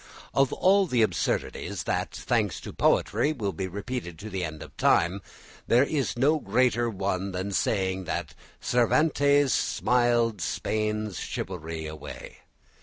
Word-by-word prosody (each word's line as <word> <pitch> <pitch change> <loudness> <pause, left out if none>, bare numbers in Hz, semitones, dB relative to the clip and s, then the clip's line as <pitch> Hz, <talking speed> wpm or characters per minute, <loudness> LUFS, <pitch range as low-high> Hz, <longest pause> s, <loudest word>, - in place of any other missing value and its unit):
Of 135 -1 +3
all 195 +1 +3
the 120 -7 +3
absurdities 90 -1 -1
that, - - -1
thanks - - 0
to - - -8
poetry, 120 +9 +2
will 105 -9 -3
be 95 -1 -3
repeated 100 -2 -5
to 105 +4 -8
the 95 -1 -2
end 80 -2 -5
of - - -14
time, 90 +4 +2 0.5
there 120 +3 +5
is 140 -4 -1
no 150 +5 +3
greater 120 +1 +2
one 95 -2 -2
than 95 +2 -3
saying 95 -2 0
that - - -3 0.3
"Cervantes 145 +2 +3
smiled 120 -4 +1
Spain's 105 +4 -2
chivalry 80 -3 -5
away." 75 0 -8
105 Hz, 135 wpm, -27 LUFS, 95-125 Hz, 0.5 s, there